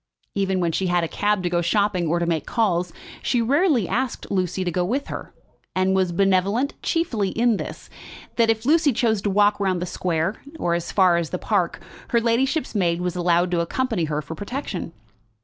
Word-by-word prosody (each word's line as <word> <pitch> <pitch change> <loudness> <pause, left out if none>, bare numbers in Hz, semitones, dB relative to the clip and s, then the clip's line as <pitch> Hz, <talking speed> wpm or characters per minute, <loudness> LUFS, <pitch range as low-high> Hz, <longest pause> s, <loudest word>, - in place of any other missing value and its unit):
Even 190 -1 0
when 170 -2 +1
she 185 +3 -1
had 175 -1 +2
a - - 0
cab 205 +2 0
to 175 - 0
go 175 -1 +2
shopping, 185 -1 +1
or 170 +2 +1
to 170 - 0
make 165 -2 -1
calls, 180 -6 +1 0.3
she 245 - +1
rarely 270 - +2
asked 260 0 -2
Lucy 185 -1 0
to 175 - -1
go 180 +2 0
with 255 +10 -2
her, - - -6 0.4
and 185 +1 +2
was 185 -2 +2
benevolent 195 +8 +2
chiefly 235 - 0
in 230 0 +2
this, - - -7 0.5
that 230 -1 +3
if 225 0 +1
Lucy 305 -1 +4
chose 220 -3 +1
to 205 - -1
walk 205 +1 +3
round 190 -3 +1
the 180 - -2
square, 175 +2 -2 0.2
or 175 - 0
as 170 0 -2
far 185 -3 +4
as 170 -2 -2
the - - -2
park, - - 0 0.3
her 235 - +2
ladyship's 245 +7 0
maid 175 -5 +1
was 180 0 -2
allowed 175 0 +2
to 175 - +1
accompany 215 +1 -1
her 150 0 -2
for 145 - -7
protection. 205 - -5
190 Hz, 200 wpm, -23 LUFS, 175-230 Hz, 0.5 s, Lucy